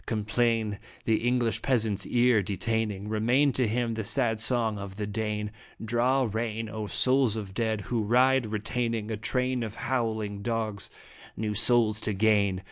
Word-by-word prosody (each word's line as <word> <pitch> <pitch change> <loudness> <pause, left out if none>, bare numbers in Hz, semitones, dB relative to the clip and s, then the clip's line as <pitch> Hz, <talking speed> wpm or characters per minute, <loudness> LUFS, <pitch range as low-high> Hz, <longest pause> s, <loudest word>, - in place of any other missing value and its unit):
Complain 110 -1 0 0.3
the 110 -1 +3
English 120 -1 0
peasant's 110 -6 0
ear 120 -3 +3
detaining, 105 +1 -2
Remain 120 +7 +2
to 125 -1 +1
him 115 +1 -1
the 110 0 -3
sad 115 0 +1
song 115 -2 +2
of 100 -1 -7
the 105 0 -3
Dane. 105 0 -3 0.3
Draw 120 +3 +1
rein, 115 0 -2
O 110 -1 -5
souls 130 -1 +2
of 100 -3 -6
dead! 110 -1 -1
who 115 +3 -2
ride 125 +3 +3
(retaining 110 +1 -2
A 110 - -2
train 125 +3 -1
of 110 -2 -5
howling 110 -5 -2
dogs) 110 -2 -3 0.5
new 105 0 -2
souls 110 0 +3
to 105 - -2
gain. 100 -2 +2
110 Hz, 155 wpm, -27 LUFS, 105-120 Hz, 0.5 s, the